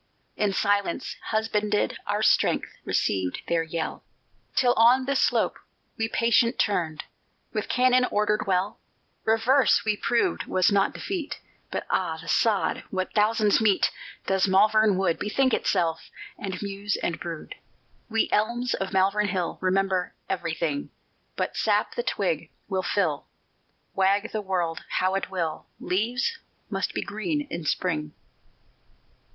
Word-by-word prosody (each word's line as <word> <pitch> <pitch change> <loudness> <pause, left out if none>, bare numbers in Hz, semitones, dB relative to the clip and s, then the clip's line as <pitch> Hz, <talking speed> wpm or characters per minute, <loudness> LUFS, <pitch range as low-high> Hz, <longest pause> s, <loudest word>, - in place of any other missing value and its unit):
In 210 -1 +1
silence 200 +1 0
husbanded 215 -1 0
our - - 0
strength - - +3 0.2
Received 95 -2 0
their 170 -1 +2
yell; 165 0 -4 0.5
Till 245 -2 +4
on 245 +3 +5
this 275 +1 +1
slope - - +1 0.4
we 225 - -1
patient 230 +1 +3
turned 165 -7 0 0.5
With - - -3
cannon 255 0 +4
ordered 210 0 +1
well; 195 +4 0 0.5
Reverse 235 +2 +3
we 215 -1 +2
proved 230 +3 0
was 185 +2 +2
not 200 -1 +2
defeat; 355 -6 -4 0.3
But - - -4
ah, 165 -4 0
the 165 - -11
sod 205 -8 +1
what 185 -1 -3
thousands 215 0 +3
meet! 210 -3 +3 0.3
Does 190 0 +2
Malvern 210 +1 +4
Wood 185 -4 +1
Bethink 260 +5 +1
itself, 165 -4 0 0.3
and 190 -2 -5
muse 200 +1 -2
and 170 - -2
brood? 170 - -6 0.6
_We 225 0 +2
elms 235 +3 +1
of 195 - -3
Malvern 195 +2 +2
Hill 185 -3 -2
Remember 185 -1 0
everything; 165 -5 -2 0.5
But - - -2
sap - - +1
the 485 - -1
twig - - -1 0.2
will 190 -2 -1
fill: 180 -6 0 0.7
Wag 200 +3 +2
the 215 - -2
world 175 -4 -2
how 185 +1 +2
it 195 - -2
will, 170 -5 -3
Leaves 235 - -1 0.3
must - - -2
be - - -1
green 215 +9 -2
in 170 -1 -4
Spring. 150 -3 -1
200 Hz, 135 wpm, -26 LUFS, 180-225 Hz, 0.7 s, on